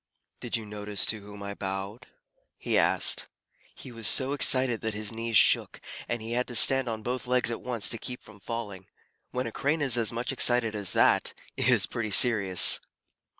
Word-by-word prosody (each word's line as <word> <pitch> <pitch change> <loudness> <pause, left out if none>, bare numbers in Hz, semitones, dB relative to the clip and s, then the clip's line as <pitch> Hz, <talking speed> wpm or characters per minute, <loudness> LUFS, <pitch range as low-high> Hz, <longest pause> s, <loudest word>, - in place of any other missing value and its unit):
"Did - - -4
you 110 - -9
notice 105 -1 -1
to 110 - -2
whom 100 0 -12
I 100 0 -6
bowed?" 95 +3 -7 0.5
he - - -4
asked. - - +2 0.5
He 130 - -12
was 115 -2 -2
so 135 0 +3
excited 130 -4 +3
that 110 -1 -4
his 105 0 -1
knees 115 0 -1
shook, - - +2 0.3
and 120 -2 -4
he 115 - -7
had 125 +1 -2
to 120 - -6
stand 135 +2 +4
on 110 -1 -6
both 125 +2 -5
legs 125 -1 0
at 115 - -6
once 120 -4 -1
to 115 - -1
keep 125 0 -8
from 110 -1 -17
falling. 100 -4 -8 0.4
When 125 +1 -4
a 115 - -6
Crane 145 +7 -2
is 130 -4 +1
as 115 - 0
much 120 +3 -3
excited 120 -4 +1
as 100 -3 -3
that, - - +1 0.2
it - - 0
is - - +3
pretty 115 -2 -5
serious. 100 -4 +5
115 Hz, 195 wpm, -26 LUFS, 105-125 Hz, 0.5 s, serious